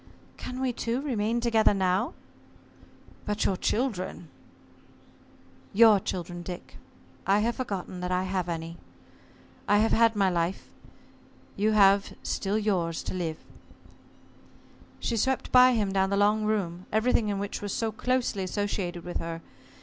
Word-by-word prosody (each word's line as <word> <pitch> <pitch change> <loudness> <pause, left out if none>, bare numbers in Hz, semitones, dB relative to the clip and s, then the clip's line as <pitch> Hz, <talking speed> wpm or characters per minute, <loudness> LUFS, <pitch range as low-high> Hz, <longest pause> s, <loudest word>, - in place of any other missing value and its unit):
"Can 255 0 -7
we 260 -2 0
two 235 +2 -2
remain 235 -4 -1
together 225 -3 +3
now?" 185 -1 0 1.1
"But 210 0 0
your 190 - +2
children?" 185 - -2 1.4
"Your 215 -1 +7
children, 175 -1 -5
Dick 175 0 -8 0.5
I 200 +2 +4
have 235 +2 0
forgotten 195 -7 -4
that 180 0 -3
I 180 0 +1
have 185 -2 -2
any. 165 0 -5 0.9
I 205 - +4
have 220 +2 +3
had 230 0 +4
my 200 -2 +3
life. 175 0 -1 0.9
You 215 +2 +1
have 200 -1 +4
still 200 +2 -1
yours 180 -6 -1
to - - -5
live." 165 -4 -3 1.6
She 235 - -1
swept 265 +4 0
by 255 0 +7
him 205 -4 0
down 190 0 +2
the 200 - 0
long 210 +1 +3
room, 185 -4 -2
everything 220 0 +2
in 200 - -1
which 200 +1 -4
was 205 -1 -4
so 225 +2 -1
closely 250 -3 -1
associated 185 -3 -3
with 175 - -4
her. 165 0 -5
200 Hz, 140 wpm, -27 LUFS, 180-225 Hz, 1.6 s, Your